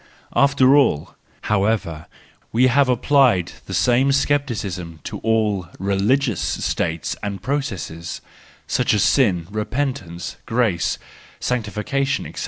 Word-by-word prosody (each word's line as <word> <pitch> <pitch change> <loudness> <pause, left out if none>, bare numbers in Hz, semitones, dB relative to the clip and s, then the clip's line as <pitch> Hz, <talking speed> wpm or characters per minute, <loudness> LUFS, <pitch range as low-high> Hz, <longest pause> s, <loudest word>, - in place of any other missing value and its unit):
After 140 -1 +5
all, 130 - +2 0.3
however, 100 -6 0 0.4
we 120 +3 +4
have 130 +1 +3
applied 125 - +3 0.2
the - - -6
same 125 +3 +3
scepticism 110 - -1
to - - -6
all 105 -5 0
religious 100 +4 +1
states 80 -5 -2
and 100 -1 -4
processes, 95 - -4 0.5
such - - +1
as 105 - +2
sin, 95 - +3
repentance, 110 -5 -3
grace, 115 -8 +1 0.4
sanctification, 125 +4 -1
&c. - - -7
110 Hz, 105 wpm, -21 LUFS, 95-135 Hz, 0.5 s, After